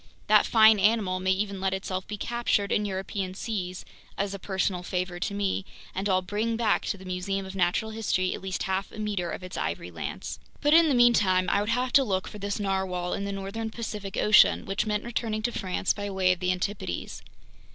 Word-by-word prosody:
That - - +5
fine 220 -2 +6
animal 200 -3 +2
may 185 0 -1
even 195 0 0
let 190 0 +1
itself 190 -1 -4
be 210 - -5
captured 235 -3 0
in 210 - +1
European 190 -1 -3
seas—as 195 -1 -5
a 200 - -5
personal 190 -1 -1
favor 180 0 -3
to 200 - -2
me—and 195 0 -3
I'll 185 -1 +2
bring 215 +5 -1
back 225 -3 +1
to 200 - -2
the 190 - -12
Museum 185 +2 -2
of 190 +1 -8
Natural 185 +4 +1
History 195 -4 0
at - - -6
least 190 -1 -3
half 190 +1 -2
a - - -11
meter 205 -5 -2
of 180 - -6
its 185 - -7
ivory - - -3
lance!" - - -5 0.2
But 295 0 +3
in 330 -1 +7
the 275 - +3
meantime 205 -7 +4
I 200 - +3
would 210 - -2
have 250 +2 0
to 275 - +7
look 190 -6 -1
for 210 - -9
this 200 +1 -3
narwhale 190 -3 -1
in 200 - -2
the 200 - -3
northern 200 +3 -4
Pacific 210 -3 -5
Ocean; 210 0 +5
which 195 +2 -1
meant 210 -1 0
returning 225 -2 -2
to 240 - +1
France 190 -3 -1
by 205 -1 -4
way 190 -2 +2
of 185 - 0
the 180 0 +1
Antipodes. 180 - -3
195 Hz, 210 wpm, -27 LUFS, 185-215 Hz, 0.2 s, in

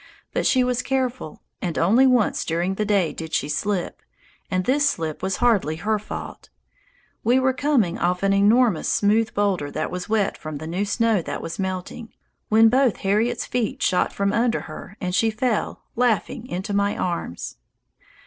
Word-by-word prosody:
But - - +1
she 255 -2 +3
was 250 -1 0
careful, 255 - -3 0.2
and 175 -3 -3
only 230 +10 +4
once 250 -4 +2
during 170 +3 -1
the 210 +2 -2
day 200 -5 +1
did 160 -1 -5
she 145 - 0
slip, 180 +5 -2 0.5
and 185 -2 -1
this 285 +2 +3
slip 160 - -4
was 190 0 -1
hardly 210 -10 +2
her 210 +6 -1
fault: 210 - -8 0.7
we 240 +3 +4
were 260 0 +2
coming 255 - +1
off 180 +2 0
an 195 0 +3
enormous 210 -1 +3
smooth 215 +2 +2
boulder 195 -8 0
that - - -3
was 180 +2 -5
wet 215 -2 0
from 155 -1 -6
the 155 - -7
new 180 +5 -2
snow 225 -1 +1
that - - -5
was 165 - -6
melting, 190 +5 -4 0.4
when 225 +1 +6
both 255 0 +3
Harriet's 220 +5 +1
feet 245 -4 -2
shot 180 - +2
from 200 0 -1
under 235 0 +1
her 170 +6 -10
and 180 -2 -3
she 225 +4 +3
fell, 220 +1 -2
laughing, 245 +1 0
into 195 0 -4
my 200 0 +1
arms. 170 - -4
205 Hz, 175 wpm, -23 LUFS, 180-240 Hz, 0.7 s, when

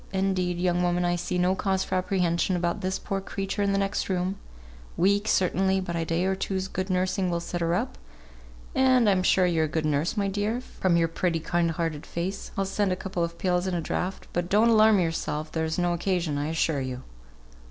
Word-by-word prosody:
indeed, 190 -2 0
young 175 0 +1
woman, 175 0 +1
I 175 0 +1
see 175 +1 -2
no 180 +1 +3
cause 190 0 0
for - - -6
apprehension 185 -1 +1
about 175 -1 -1
this 185 +1 -1
poor 195 0 -3
creature 195 +1 -3
in 200 0 +2
the 195 - +1
next 195 0 -1
room; 185 +1 -1 0.6
weak 200 +3 +2
certainly; 190 0 +2
but 175 -2 -4
a 165 -1 -1
day 165 +3 0
or 190 - +2
two's 190 0 -2
good 190 0 -4
nursing 185 0 0
will 170 -1 0
set 175 +1 -4
her 170 +1 +1
up, 65 - -3 0.7
and 260 -3 +4
I'm 190 -2 +3
sure 185 0 +4
you're 165 -3 +2
a 155 - -7
good 155 - 0
nurse, 150 +7 0
my 200 -1 +1
dear, 205 +4 -1
from 185 -8 0
your 165 -1 +3
pretty, 165 0 -1
kind 170 +1 0
hearted 165 -2 -3
face, 185 +4 -4
I'll 195 - +1
send 195 0 0
a - - +1
couple 185 -2 -3
of 170 0 -4
pills 180 0 0
and 180 -2 -1
a - - -2
draught, 180 +4 -3
but 175 0 -1
don't 215 +4 +4
alarm 215 -2 +6
yourself, 155 -2 -2
there's 160 0 -1
no 175 -1 +1
occasion, 175 -3 -1
I 145 - -1
assure 160 -2 0
you." 130 -1 -5
180 Hz, 215 wpm, -26 LUFS, 170-195 Hz, 0.7 s, alarm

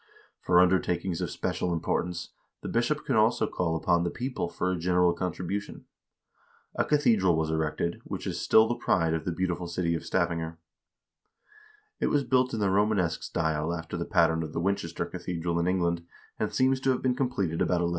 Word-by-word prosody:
For 90 -1 +3
undertakings 90 -1 +2
of - - -2
special 90 - -2
importance 85 +1 -2 0.3
the - - -6
bishop 120 +6 0
could 135 - 0
also 110 +2 +3
call 85 -2 -1
upon 85 +1 +2
the 85 - 0
people 125 -5 -3
for 90 - -1
a - - 0
general 90 0 +2
contribution. 90 +3 -4 0.9
A - - +1
cathedral 110 - +3
was 80 0 0
erected, 80 +2 -1
which - - -6
is - - -3
still 110 0 +5
the 120 - 0
pride 85 -8 +1
of 80 - -2
the 90 - -1
beautiful 90 0 -2
city 85 -1 -1
of 80 - -3
Stavanger. 85 -2 -1 1.4
It - - +1
was 145 -1 +2
built 130 -1 +2
in 110 - -2
the 100 -2 +1
Romanesque 100 -4 +1
style 80 -1 -1
after 80 +1 -6
the 85 0 -2
pattern 80 -1 +3
of 80 -1 -5
the - - -2
Winchester 85 -2 -1
cathedral 85 -1 -3
in 85 - 0
England, 85 -2 0 0.4
and - - -1
seems 130 0 +2
to 135 - 0
have 130 - +1
been 130 -1 +2
completed 125 -11 -1
about 90 -1 +2
1150. - - 0
90 Hz, 185 wpm, -28 LUFS, 85-105 Hz, 1.4 s, still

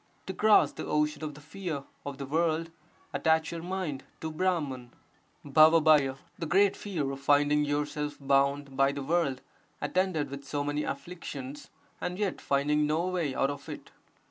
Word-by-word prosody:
To 190 - -4
cross 215 +2 +5
the - - -7
ocean 150 +1 0
(of 150 -2 -4
the 150 - -12
fear) 160 -2 -5 0.2
of 140 -1 -5
the 140 - -5
world, 165 +2 0 0.4
attach 160 -1 +2
your 170 -1 -5
mind 175 -6 -3 0.2
to 160 - -3
Brahman. 155 -8 -1 0.5
[*R^PT 155 -2 +5
— - - -32
the 165 - -3
great 195 +4 +4
fear 160 -9 -3
of 135 - -6
finding 145 +1 +3
yourself 145 0 -2
bound 140 0 +1
by 135 +1 +3
the 140 -1 -4
world 145 -4 0 0.4
attended 185 -6 0
with 140 0 -7
so 145 +1 -2
many 145 +1 -1
afflictions 140 -2 -6 0.3
and 180 0 -3
yet 205 -2 -2
finding 150 +2 +2
no 160 +3 +1
way 165 -7 -1
out 135 - +2
of 140 0 -9
it. - - -8
150 Hz, 170 wpm, -29 LUFS, 140-165 Hz, 0.5 s, cross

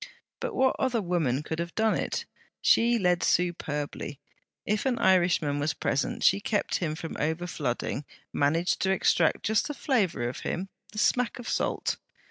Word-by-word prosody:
But - - -4
what 260 0 +3
other 255 -3 +1
woman 165 - 0
could 160 +1 -4
have 170 +1 -4
done 220 -1 +3
it! - - -2 0.3
She 235 +1 +4
led 180 -4 +2
superbly. 150 -4 -1 0.5
If 215 +5 0
an 250 -2 +1
Irishman 175 -7 +3
was 145 +2 0
present, 140 - -1
she - - +5
kept 205 0 0
him 155 -3 -2
from 165 0 -6
overflooding, 150 -4 -2 0.3
managed 165 +5 +1
to 190 - +1
extract 175 -3 +2
just 220 0 +2
the 295 - -5
flavour 205 - 0
of 120 - -5
him, 190 +3 -3 0.2
the 215 - -12
smack 250 +3 +2
of 245 - -8
salt. - - -1
175 Hz, 160 wpm, -28 LUFS, 155-220 Hz, 0.5 s, she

